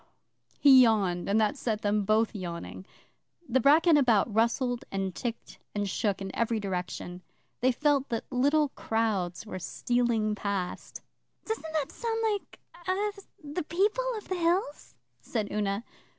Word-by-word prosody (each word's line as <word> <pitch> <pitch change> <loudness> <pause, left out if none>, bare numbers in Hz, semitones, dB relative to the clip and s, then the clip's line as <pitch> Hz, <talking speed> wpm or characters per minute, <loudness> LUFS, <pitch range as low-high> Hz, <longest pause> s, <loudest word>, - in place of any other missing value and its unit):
He 270 -3 +8
yawned, 200 -7 +2
and 205 +2 +3
that 215 +3 +2
set 220 -5 -2
them 205 0 +1
both 215 +2 +2
yawning. 185 0 -6 0.6
The 260 +2 +2
bracken 310 +5 +5
about 235 -5 +3
rustled 240 +2 +1
and 195 -1 -2
ticked 235 +5 -6 0.2
and 205 -1 -1
shook 195 +1 -1
in 190 - -6
every 230 -1 0
direction. 180 -2 -4 0.4
They 255 +2 +3
felt 285 +1 +1
that 230 - -2
little 285 +4 +3
crowds 215 -7 -1
were 200 -3 -6
stealing 235 0 0
past. 200 -3 -4 0.4
'Doesn't 440 -8 -4
that 305 -3 -1
sound 455 -1 -3 0.2
like 405 - -7 0.3
er 405 +3 +1 0.3
the 295 +4 -4
People 415 +10 +1
of 420 - -9
the 370 - -2
Hills?' 335 -3 -1 0.3
said 210 - -3
Una. 205 +1 -1
230 Hz, 145 wpm, -29 LUFS, 205-290 Hz, 0.6 s, He